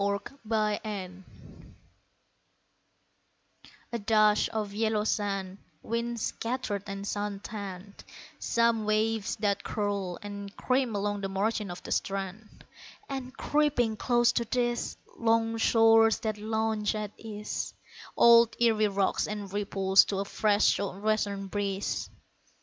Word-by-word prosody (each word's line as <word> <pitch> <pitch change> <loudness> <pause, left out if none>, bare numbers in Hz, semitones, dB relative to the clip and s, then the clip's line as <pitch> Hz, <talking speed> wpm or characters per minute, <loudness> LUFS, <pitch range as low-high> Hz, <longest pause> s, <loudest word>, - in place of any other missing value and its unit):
ERIE 200 0 +1 0.3
WATERS 210 -3 -1 2.8
A 235 - -1
dash 215 0 +3
of 210 -2 -3
yellow 215 0 +1
sand, 195 -3 -2 0.2
Wind 235 +1 -2
scattered 225 -3 -2
and 195 0 -5
sun 205 -1 -3
tanned; 200 -2 -8 0.4
Some 230 -2 +2
waves 215 0 +1
that 200 -2 0
curl 200 -4 -2
and 200 -1 -7
cream 255 -3 +1
along 205 0 -1
the 195 - -3
margin 205 +1 -1
of 175 - -8
the - - -8
strand; 195 +2 -4 0.4
And, 265 -1 -6
creeping 290 -7 +1
close 240 +1 +3
to 235 - -1
these 240 0 -1 0.2
Long 225 0 +2
shores 225 -1 +5
that 215 -1 -2
lounge 220 0 -1
at 210 -1 -4
ease, 210 -2 -5 0.4
Old 235 -1 +7
Erie 220 -3 +4
rocks 195 -1 0
and 205 -2 -5
ripples 195 -1 +4
to 195 - -3
a 200 - -1
fresh 205 +1 +2
sou' 200 -1 -4
western 205 -2 0
breeze. 200 0 -2
210 Hz, 120 wpm, -29 LUFS, 200-225 Hz, 2.8 s, Old